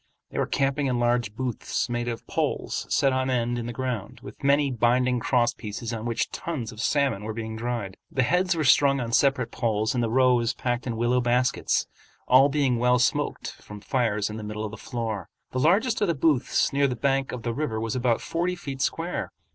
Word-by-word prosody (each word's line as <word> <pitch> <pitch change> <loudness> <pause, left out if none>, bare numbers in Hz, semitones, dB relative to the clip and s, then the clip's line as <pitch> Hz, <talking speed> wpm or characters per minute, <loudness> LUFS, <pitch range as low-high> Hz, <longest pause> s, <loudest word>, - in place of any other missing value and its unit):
They - - -3
were - - +1
camping 140 +1 0
in 125 -2 0
large 120 -3 +1
booths 125 -1 -2
made 120 -1 -2
of 115 -1 -4
poles - - -2
set 135 -1 +3
on 130 0 0
end 120 -1 0
in 115 - -4
the - - -3
ground, 120 -4 -4
with 105 - -11
many 140 0 +3
binding 125 +1 +2
cross 120 0 +2
pieces 115 +1 -6
on 115 +1 -4
which 115 - -1
tons 140 -10 -4
of 110 - -7
salmon 140 -9 +1
were 110 0 -5
being 110 -1 -5
dried. 115 -4 -4
The 130 - +1
heads 180 +7 +2
were 160 - 0
strung 140 0 +5
on 120 -2 -3
separate 130 -2 +2
poles 110 -2 0
and 120 -2 0
the 115 - 0
roes 125 -1 +3
packed 120 0 -2
in 115 -2 -2
willow 120 +2 +2
baskets, 125 +1 +1 0.4
all 130 +3 +6
being 135 -4 +1
well 125 +1 +4
smoked 125 -1 0
from 105 0 -10
fires 105 -3 0
in 105 - -6
the 110 - -6
middle 105 +1 -4
of 105 - -5
the - - -7
floor. 110 -6 -4 0.2
The 130 - -2
largest 210 - +2
of 205 - +3
the 170 - +1
booths 140 -3 +2
near 140 0 +3
the 125 - -2
bank 135 +2 0
of 125 -2 -6
the 120 - -1
river 120 -5 -2
was 115 0 -2
about 120 -2 +1
forty 175 +2 -1
feet 140 -6 -6
square. 165 +6 -2
125 Hz, 215 wpm, -26 LUFS, 115-135 Hz, 0.4 s, all